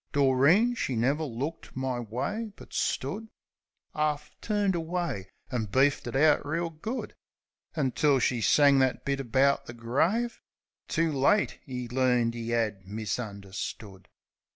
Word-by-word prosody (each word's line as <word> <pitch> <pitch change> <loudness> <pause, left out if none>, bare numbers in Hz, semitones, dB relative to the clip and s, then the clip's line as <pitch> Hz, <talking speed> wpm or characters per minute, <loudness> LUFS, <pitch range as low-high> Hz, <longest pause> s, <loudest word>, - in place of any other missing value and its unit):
Doreen 145 - +4
she 135 - -2
never 135 +7 +1
looked 145 +4 -5
my 130 -2 -1
way; 195 - -3
but - - -14
stood 200 +12 -2 0.7
'Arf 150 -1 -1
turned 205 -3 +1
away, 165 - -3 0.2
an' 120 -4 -1
beefed 135 +8 +2
it - - -5
out 150 +2 +4
reel 165 +3 -2
good, 215 +11 -5 0.6
Until 140 -1 +2
she 125 -2 +1
sang 140 +6 +5
that 130 -1 +1
bit 140 0 0
about 135 +2 +2
the 120 - -7
grave; 165 - 0 0.5
"Too 165 0 +1
late 145 +9 +2
'e 125 -2 -4
learned 125 -2 +2
'e 115 0 -4
'ad 110 -5 -1
misunderstood!" 100 -2 -5
135 Hz, 130 wpm, -28 LUFS, 120-160 Hz, 0.7 s, sang